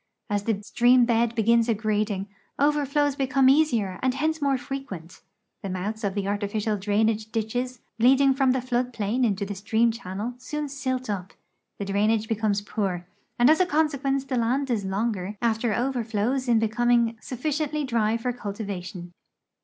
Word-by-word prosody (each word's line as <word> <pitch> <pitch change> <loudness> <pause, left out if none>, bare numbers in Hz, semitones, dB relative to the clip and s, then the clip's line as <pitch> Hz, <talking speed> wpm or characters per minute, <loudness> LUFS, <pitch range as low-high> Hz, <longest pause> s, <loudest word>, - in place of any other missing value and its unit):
As 205 0 0
the 220 -3 0
stream 245 +3 +4
bed 235 0 +1
begins 230 +1 +3
aggrading, 210 -2 0 0.3
over 290 0 +2
flows 290 0 +1
become 265 -1 +2
easier 240 -11 +2
and 260 0 +1
hence 315 +2 -1
more 275 -2 +2
frequent; 245 - -7 0.4
the 195 - -5
mouths 205 +5 -4
of 200 -1 -1
the 200 -1 -2
artificial 205 +1 -1
drainage 215 +2 0
ditches 245 +2 -2 0.2
leading 270 +3 +5
from 270 0 +2
the 255 -1 +1
flood 250 0 -1
|ilain 225 +3 -1
into 205 -3 +1
tbe 200 0 -6
stream 220 +3 +2
channel 225 0 -5
soon 300 +4 -4
silt 260 -2 -3
up; 195 -3 -4 0.4
the 200 - -4
drainage 210 +3 +1
becomes 215 -2 0
poor, 190 -4 -3 0.3
and 240 - +5
as 315 +4 +5
a 370 - +5
consequence 280 -4 0
the 260 -2 -2
land 255 +4 0
is 210 -4 0
longer 200 0 -2
after 230 0 +1
overilows 240 +1 -1
in 235 -2 +4
be 225 0 +2
coming 235 0 +2
sufficientlv 300 +3 -2
drv 230 -3 +1
for 250 +1 -1
cultivation. 195 -5 -6
230 Hz, 165 wpm, -25 LUFS, 205-260 Hz, 0.4 s, leading